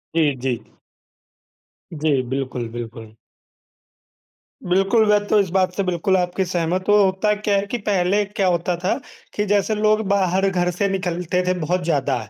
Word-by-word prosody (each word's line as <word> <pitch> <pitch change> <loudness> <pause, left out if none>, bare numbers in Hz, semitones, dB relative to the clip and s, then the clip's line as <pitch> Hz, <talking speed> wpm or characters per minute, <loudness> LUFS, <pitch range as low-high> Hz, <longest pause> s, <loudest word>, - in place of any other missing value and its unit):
जी, 150 -4 +2
जी। 125 -3 -1 1.3
जी, 150 -3 +1
बिल्कुल, 130 -3 -3
बिल्कुल। 115 -2 -8 1.5
बिल्कुल, 195 +5 +2
मैं 205 0 +3
तो 210 - +3
इस 190 -3 +1
बात 185 -1 +2
से 200 - 0
बिल्कुल 185 +1 +1
आपकी 180 +1 0
सहमत 175 +1 -1
हूँ। 205 - +6
होता 200 +1 +2
क्या 205 -1 0
है 200 - -1
कि 245 - 0
पहले 200 -1 +1
क्या 200 -1 -1
होता 175 0 0
था 185 - +2 0.4
कि 210 - -1
जैसे 205 +2 +1
लोग 215 +1 +2
बाहर 195 -1 +2
घर 180 -1 0
से 200 +3 0
निकलते 180 -2 -1
थे 185 - +3
बहुत 175 +3 -1
ज़्यादा, 140 -5 0
185 Hz, 160 wpm, -21 LUFS, 165-200 Hz, 1.5 s, हूँ